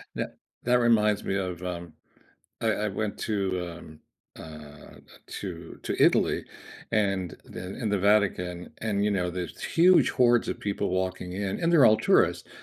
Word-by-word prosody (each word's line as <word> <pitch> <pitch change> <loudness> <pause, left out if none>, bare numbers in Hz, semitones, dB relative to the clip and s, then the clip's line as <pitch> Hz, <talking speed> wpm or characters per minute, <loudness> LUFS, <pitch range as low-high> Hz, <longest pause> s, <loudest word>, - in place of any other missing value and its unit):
Tha - - -3 0.3
that 125 - +2
reminds 110 -3 +3
me 95 - -1
of, 90 -2 -3
um, 85 -2 -5 0.7
I 115 - 0 0.2
I - - 0
went 105 +1 -3
to, 95 -4 -1
um, 80 -2 -14 0.4
uh, 75 -2 -12 0.3
to 85 -4 -7
to - - -1
Italy - - +3 0.5
and 100 -5 0
the 90 +2 -8
in 115 -4 -2
the 100 -1 +1
Vatican, 95 -3 +1
and, 105 -2 -1
you 105 - +2
know, 90 -3 0
there's 90 0 -6
huge 180 +2 +4
hordes 120 -2 +3
of - - -4
people 100 0 -2
walking 95 -1 -2
in, 100 +1 -3
and 170 +1 +1
they're 155 -6 +6
all 110 - +7
tourists, 110 - +2
100 Hz, 160 wpm, -27 LUFS, 90-110 Hz, 0.7 s, all